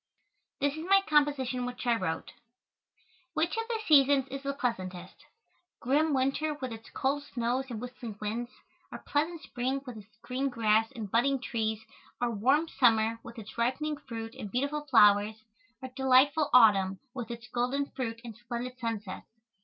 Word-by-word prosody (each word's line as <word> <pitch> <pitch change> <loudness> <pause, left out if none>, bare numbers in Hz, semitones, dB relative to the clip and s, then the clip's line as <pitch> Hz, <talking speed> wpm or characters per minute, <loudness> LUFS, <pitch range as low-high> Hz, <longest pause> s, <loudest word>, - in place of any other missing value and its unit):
This 285 0 +1
is 315 - -6
my 390 0 +7
composition 285 -4 +2
which 250 +1 -6
I 240 -1 +3
wrote: 185 -7 -3 1.0
"Which 320 +5 +1
of 455 0 -2
the 470 -2 -1
seasons 275 -2 +5
is 275 0 -5
the 280 0 -3
pleasantest? 185 -8 -3 0.6
Grim 295 +5 +2
winter 275 +4 0
with 260 -5 -5
its 225 0 -11
cold 280 +2 -1
snows 245 -1 -2
and 230 -3 -5
whistling 240 -3 -7
winds, 225 +3 -3 0.4
or - - -6
pleasant 315 +3 -2
spring 260 +2 -2
with 250 -4 -8
its 210 0 -15
green 265 +2 -1
grass 225 -1 +2
and 215 -5 -6
budding 265 +4 +2
trees, 220 -3 -2 0.3
or 245 -1 0
warm 265 +9 +2
summer 230 -5 +3
with 235 +1 -11
its 220 +1 -9
ripening 295 +6 0
fruit 225 -4 -7
and 210 - -7
beautiful 285 +4 -1
flowers, 210 -5 +5 0.5
or 260 - -5
delightful 265 +3 +3
autumn 195 -6 +6 0.2
with 240 -4 -6
its 235 0 -7
golden 250 +4 0
fruit 230 -3 -4
and 230 -3 -8
splendid 240 +2 -6
sunsets? 225 -5 -4
250 Hz, 160 wpm, -30 LUFS, 225-275 Hz, 1.0 s, my